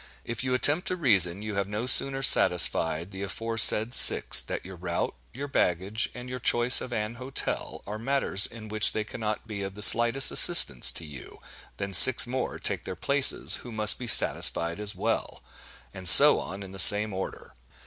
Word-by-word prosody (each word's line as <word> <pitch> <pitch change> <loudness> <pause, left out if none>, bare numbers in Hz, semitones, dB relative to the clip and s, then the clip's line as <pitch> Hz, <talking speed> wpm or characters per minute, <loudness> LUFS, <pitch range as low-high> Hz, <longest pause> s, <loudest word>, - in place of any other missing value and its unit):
If 115 +2 -7
you 130 -1 -3
attempt 150 +7 -1
to 185 - -3
reason, 100 - 0
you 110 -1 -8
have 100 -1 -5
no 105 +4 -7
sooner 135 +1 0
satisfied 85 -4 +1
the 95 0 -11
aforesaid 115 +2 -1
six, - - +1
that - - -9
your 95 0 -12
route, 85 0 -6 0.2
your 140 +3 -9
baggage, 100 -2 -4
and 125 0 -11
your 125 0 -9
choice 120 +1 +4
of 130 - -10
an 110 0 -7
hotel, 130 +1 -7
are 105 +2 -9
matters 125 -5 -2
in 110 -1 -14
which 110 0 +4
they 110 - -5
cannot 110 -1 -8
be 105 -2 -9
of 95 0 -9
the 105 - -10
slightest 120 +5 +4
assistance 165 - +4
to 85 - -11
you, 70 -3 -14 0.4
than 100 -1 -8
six 130 +5 +6
more 130 +1 -7
take - - -6
their - - -9
places, 140 -1 +2
who 120 - -14
must 110 0 +2
be 125 - -9
satisfied 85 -4 -2
as 105 0 -2
well; - - -6 0.5
and 95 -2 -2
so 145 +9 +7
on 100 +2 -10
in 95 - -14
the 95 - -13
same 105 +2 +5
order. 95 0 -10
110 Hz, 190 wpm, -24 LUFS, 95-125 Hz, 0.5 s, so